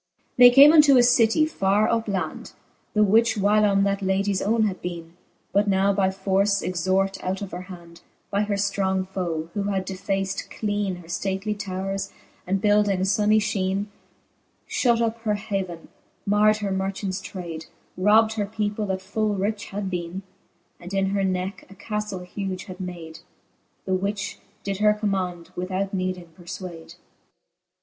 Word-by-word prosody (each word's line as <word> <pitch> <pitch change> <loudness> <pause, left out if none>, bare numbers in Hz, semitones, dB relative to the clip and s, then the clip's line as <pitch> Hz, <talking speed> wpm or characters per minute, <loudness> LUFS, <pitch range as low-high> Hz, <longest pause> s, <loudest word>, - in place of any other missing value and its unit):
XXV. - - -43
They 245 0 +10
came 280 +5 +8
unto 295 -4 +7
a 245 - +6
citie 245 +4 +4
farre 205 -6 +2
up 230 -1 0
land. 185 -6 -4 0.4
The 210 - +5
which 225 +3 +4
whylome 205 -1 +3
that 200 0 0
ladies 195 0 0
owne 220 +2 +2
had 195 -4 -1
bcene; 170 -2 -6 0.4
But 200 +2 +3
now 195 0 +3
by 190 -1 +2
force 195 +1 +1
extort 190 +2 0
out 190 +2 -2
of 195 - -7
her 180 - -5
hand, 170 -2 -12 0.3
By 200 - +1
her 210 -1 0
ftrong 195 -1 0
foe, 170 -4 -3
who 200 -1 -2
had 195 -2 -1
defaced 195 +1 -3
cleene 205 -3 -2
Her - - -16 0.2
{lately 195 +2 -1
towres, 195 -1 -4 0.4
and 195 +2 +1
buildings 205 -1 +2
funny 215 0 +3
{heene; 200 -1 -1 0.7
Shut 235 -2 +1
up 230 0 -1
her 215 -2 0
haven, 195 -5 -4 0.4
mard 210 +1 +4
her 195 - -1
marchants 190 0 -2
trade, 170 -5 -7 0.3
Robbed 215 +4 +4
her 205 -1 0
people, 210 0 -2
that 190 -1 -3
full 210 +1 -1
rich 205 +3 -2
had 195 -1 -4
beene. 175 +2 -4 0.6
And 180 +3 -7
in 195 0 +1
her 200 0 0
necke 185 +1 -3
a 195 - -13
caftle 210 -2 -4
huge 190 0 -5
had 185 -3 -10
made. 170 -4 -7 0.7
The 190 - -1
which 200 +2 -2 0.2
did 195 -1 -3
her 210 0 +4
command, 185 -5 -2
without 190 +2 -3
needing 185 -2 -3
perfwade. 175 -1 -9
195 Hz, 160 wpm, -24 LUFS, 185-210 Hz, 0.7 s, They